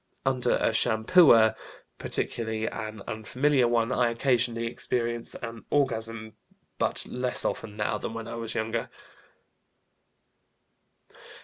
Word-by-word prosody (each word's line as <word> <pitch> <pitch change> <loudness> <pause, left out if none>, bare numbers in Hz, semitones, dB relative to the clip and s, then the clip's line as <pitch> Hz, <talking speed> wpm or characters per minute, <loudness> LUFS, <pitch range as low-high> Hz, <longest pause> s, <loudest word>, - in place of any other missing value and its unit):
Under 130 -2 +2
a 115 - +1
shampooer, 110 +1 +5 0.4
particularly 110 -1 -1
an 110 -3 -5
unfamiliar 125 +5 +1
one, 120 0 +1
I 120 -2 +2
occasionally 115 -1 0
experience 120 0 -3
an 115 -3 -7
orgasm, 115 -5 -1 0.5
but - - -1
less 125 0 0
often 105 -2 -3
now 105 - -1
than 115 - -5
when 115 0 -6
I - - -6
was 115 -1 -4
younger." 115 +1 -2
115 Hz, 110 wpm, -27 LUFS, 110-125 Hz, 0.5 s, shampooer